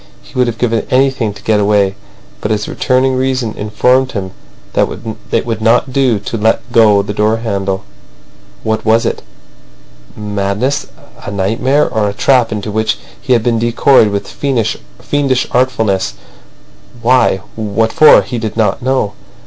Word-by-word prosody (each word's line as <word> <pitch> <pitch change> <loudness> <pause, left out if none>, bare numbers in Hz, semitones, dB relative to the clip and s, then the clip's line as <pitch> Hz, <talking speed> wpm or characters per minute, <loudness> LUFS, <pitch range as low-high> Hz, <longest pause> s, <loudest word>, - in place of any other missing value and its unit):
He - - -18
would 125 -1 +1
have 115 -1 -3
given 115 -1 -1
anything 130 -4 +1
to 100 0 -13
get 110 -1 +2
away, 100 -1 +2 0.5
but - - -2
his 105 -1 -1
returning 130 +1 +1
reason 130 -3 -1
informed 125 +5 +1
him 95 -3 -4 0.4
that - - +2 0.4
it - - +1
would 115 -2 -3
not 120 +3 +2
do 130 -5 +2
to 105 +3 -5
let 110 +3 0
go 105 -4 +5
the 105 - -5
door 105 +2 +1
handle. 100 -4 -2 0.8
What 110 0 -1
was 115 +1 +2
it—madness, 100 - -5 0.4
a - - -6
nightmare, 115 +9 +1
or 105 -2 0
a - - -5
trap 125 -2 +2
into 105 0 -4
which 110 0 0 0.2
he 130 - +1
had 115 -2 +2
been 115 -1 +1
decoyed 120 +1 +4
with 100 -1 -3
fiendish 130 - -2
artfulness? 110 - 0 0.8
Why—what 110 -2 0
for? 155 - +7
He 120 - -4
did 110 -1 -4
not 105 -4 +1
know. 130 -5 0
110 Hz, 150 wpm, -14 LUFS, 105-125 Hz, 0.8 s, for